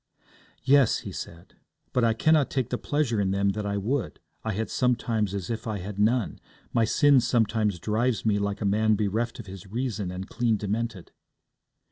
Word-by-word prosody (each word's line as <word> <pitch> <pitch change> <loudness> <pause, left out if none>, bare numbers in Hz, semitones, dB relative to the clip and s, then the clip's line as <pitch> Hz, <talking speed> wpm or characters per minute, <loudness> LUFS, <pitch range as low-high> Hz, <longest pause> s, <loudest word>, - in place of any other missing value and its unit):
'Yes,' 135 -2 +4
he - - -7
said, 85 +1 -9 0.4
'but 125 - +2
I 115 -1 +3
cannot 155 +3 +3
take 130 -4 -2
the 125 - -1
pleasure 140 -8 0
in 95 - +1
them 100 +1 +1
that 105 +1 -2
I 100 0 -1
would. 120 +5 -2 0.2
I 110 - -1
am 110 +2 -1
sometimes 115 -5 0
as 100 +1 -4
if 115 0 -4
I 110 -2 -2
had 100 +2 -6
none. 110 +1 +1 0.3
My 115 - +3
sin 145 +3 +5
sometimes 110 -5 +1
drives 110 +3 0
me 105 -2 +2
like 100 0 -2
a - - -1
man 110 +2 +3
bereft 110 +4 -1
of 115 - -7
his 95 0 -10
reason 110 -3 -3
and 90 +1 -6
clean 115 -2 0
demented.' 105 -1 -3
110 Hz, 185 wpm, -26 LUFS, 100-120 Hz, 0.4 s, sin